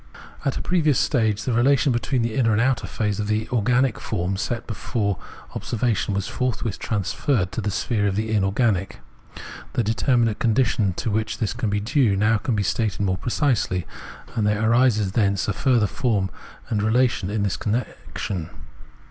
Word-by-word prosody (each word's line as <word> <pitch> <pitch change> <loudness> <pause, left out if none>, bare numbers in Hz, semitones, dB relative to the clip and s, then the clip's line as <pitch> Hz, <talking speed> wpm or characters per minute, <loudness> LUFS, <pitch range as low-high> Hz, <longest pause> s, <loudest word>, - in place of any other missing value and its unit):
At 135 - -1
a - - -4
previous 155 -7 +2
stage 110 -6 +1
the 125 - -1
relation 135 +4 +3
between 120 +1 0
the 115 -1 -1
inner 115 -2 +2
and 105 - +2
outer 120 -3 +1
phases 105 +2 -2
in 105 - -2
the 110 +1 0
organic 125 +2 +2
form 95 -2 -2
set 115 +4 -3
before 105 -3 -2 0.3
observation 110 -3 -1
was 100 - -1
forthwith 120 -5 -2
transferred 100 0 -1
to 115 - -3
the 105 - -1
sphere 105 +1 0
of 95 - -1
the 110 +1 -1
inorganic. 100 -1 +1 0.7
The 120 - +1
determinate 115 0 +1
condition 110 -4 +2
to 110 - -3
which 110 +1 -1
this 110 - -1
is 105 -4 -1
due 125 +1 +2
can - - -1
now 110 +1 +3
be 105 -1 0
stated 105 +1 -1
more 95 -2 +1
precisely, 120 - 0 0.5
and 105 -2 +1
there 105 +1 +1
arises 115 -4 +3
thence 100 -2 +1
a 105 - 0
further 125 -1 +2
form 105 -6 0 0.4
and 105 -2 0
relation 110 -3 +2
in 105 0 -1
this 100 - 0
connection. 105 -6 -3
110 Hz, 170 wpm, -23 LUFS, 100-120 Hz, 0.7 s, relation